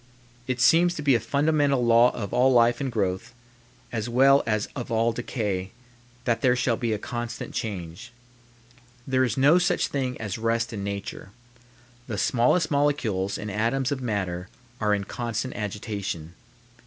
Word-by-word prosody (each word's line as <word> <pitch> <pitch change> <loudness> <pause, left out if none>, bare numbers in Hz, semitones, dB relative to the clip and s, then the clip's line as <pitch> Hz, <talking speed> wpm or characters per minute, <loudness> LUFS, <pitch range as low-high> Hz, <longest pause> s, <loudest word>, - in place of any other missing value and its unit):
It 130 -1 -2
seems 175 +7 +4
to 150 - -5
be 140 -2 +4
a 120 - +3
fundamental 140 +1 +1
law 120 +1 +6
of 100 -5 -5
all 130 +2 +4
life 120 +1 +4
and 135 -2 -2
growth, 100 0 -2 0.6
as 115 0 -3
well 135 +3 +5
as 110 -1 0
of 125 -4 -5
all 115 +1 +2
decay, 105 -5 -3 0.6
that 115 -2 +1
there 125 -2 +4
shall 125 -1 +1
be 115 0 -2
a 110 - 0
constant 120 +2 -5
change. 90 -6 -5 0.9
There 130 -1 +2
is 120 -2 -1
no 145 +6 +5
such 180 0 +1
thing 130 -3 -2
as 110 -1 -4
rest 115 +1 0
in 100 -2 -4
nature. 100 0 -5 0.8
The 110 -4 -4
smallest 125 - +2
molecules 125 -10 0
and 105 -1 -5
atoms 120 +6 0
of 135 -2 -2
matter 95 -6 -3 0.3
are 105 -1 +2
in 100 - -3
constant 120 +4 -4
agitation. 100 -6 -4
115 Hz, 160 wpm, -25 LUFS, 105-130 Hz, 0.9 s, law